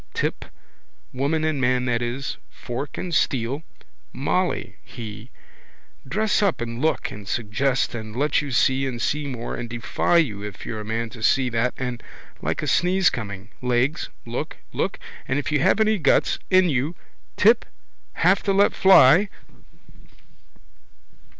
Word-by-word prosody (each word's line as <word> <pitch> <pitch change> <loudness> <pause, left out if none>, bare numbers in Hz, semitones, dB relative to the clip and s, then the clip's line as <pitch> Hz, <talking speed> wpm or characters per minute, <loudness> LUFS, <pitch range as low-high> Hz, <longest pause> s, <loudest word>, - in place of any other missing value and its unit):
Tip. - - -2 0.7
Woman 145 +5 0
and 155 -3 0
man 125 0 +2
that 120 -2 0
is. 120 +3 -3
Fork 130 +3 -6
and 180 -2 -4
steel. 130 -1 0 0.5
Molly, 175 +8 -1
he. 110 0 -9 0.8
Dress 215 0 +1
up 200 -4 +1
and 115 +1 -4
look 160 +1 0
and 105 -2 -10
suggest 120 +6 0
and 110 -2 -6
let 145 +4 +2
you 145 - -5
see 130 +1 +2
and 120 -3 -4
see 150 +4 -1
more 120 -4 -5
and 120 -1 -5
defy 120 +8 +1
you 115 -12 +1
if 105 -1 -8
you're 110 - -4
a - - -6
man 110 +1 -3
to 120 -3 -11
see 130 +3 +3
that 120 +1 0
and, 125 -2 -4 0.4
like - - -2
a - - -3
sneeze 185 +1 +3
coming, 100 -2 -6
legs, 125 +4 0 0.2
look, - - -5 0.2
look - - -1 0.3
and 130 - 0
if 145 - -2
you 150 - +2
have 200 - +3
any 215 -1 +3
guts 140 - +2
in 185 -1 +5
you. 145 +2 0 0.4
Tip. - - +5 0.5
Have 185 +3 +3
to 200 - 0
let 200 +1 +4
fly. 190 +1 +6
130 Hz, 155 wpm, -23 LUFS, 120-155 Hz, 0.8 s, fly